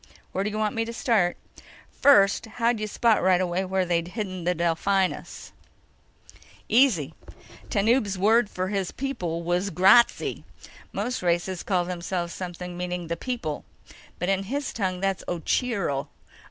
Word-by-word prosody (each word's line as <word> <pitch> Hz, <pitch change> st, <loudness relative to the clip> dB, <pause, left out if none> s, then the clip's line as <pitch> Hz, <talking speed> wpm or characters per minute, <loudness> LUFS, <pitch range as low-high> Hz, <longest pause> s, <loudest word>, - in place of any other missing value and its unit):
"Where 190 Hz, -, -1 dB
do 210 Hz, -, -1 dB
you 215 Hz, -, -4 dB
want 215 Hz, -1 st, 0 dB
me 225 Hz, -, 0 dB
to 230 Hz, -, -6 dB
start?" 215 Hz, -7 st, +1 dB, 0.5 s
"First, 205 Hz, -4 st, +4 dB
how'd 230 Hz, +1 st, 0 dB
you 215 Hz, -, -2 dB
spot 225 Hz, +1 st, +2 dB
right 185 Hz, -1 st, +4 dB
away 185 Hz, +1 st, -1 dB
where 190 Hz, 0 st, 0 dB
they'd 170 Hz, -1 st, 0 dB
hidden 185 Hz, -3 st, -5 dB
the 180 Hz, 0 st, +1 dB
Delphinus?" 175 Hz, +3 st, -1 dB, 1.2 s
"Easy. 215 Hz, -, +3 dB, 0.6 s
Tanub's 210 Hz, -1 st, +2 dB
word 220 Hz, +3 st, +3 dB
for 185 Hz, -1 st, -3 dB
his 195 Hz, -3 st, -1 dB
people 175 Hz, -12 st, -4 dB
was 175 Hz, +3 st, 0 dB
Grazzi. 195 Hz, +6 st, +4 dB, 0.5 s
Most 235 Hz, +6 st, -3 dB
races 175 Hz, +1 st, 0 dB
call 180 Hz, -3 st, 0 dB
themselves 175 Hz, -1 st, -3 dB
something 180 Hz, -1 st, -6 dB
meaning 180 Hz, -1 st, -4 dB
The 170 Hz, -, -1 dB
People. 165 Hz, -, -4 dB, 0.5 s
But 180 Hz, -, -2 dB
in 195 Hz, 0 st, 0 dB
his 280 Hz, +6 st, -3 dB
tongue 185 Hz, -4 st, -2 dB
that's 195 Hz, -1 st, -1 dB
Ocheero. 175 Hz, -, -1 dB
190 Hz, 145 wpm, -25 LUFS, 175-215 Hz, 1.2 s, First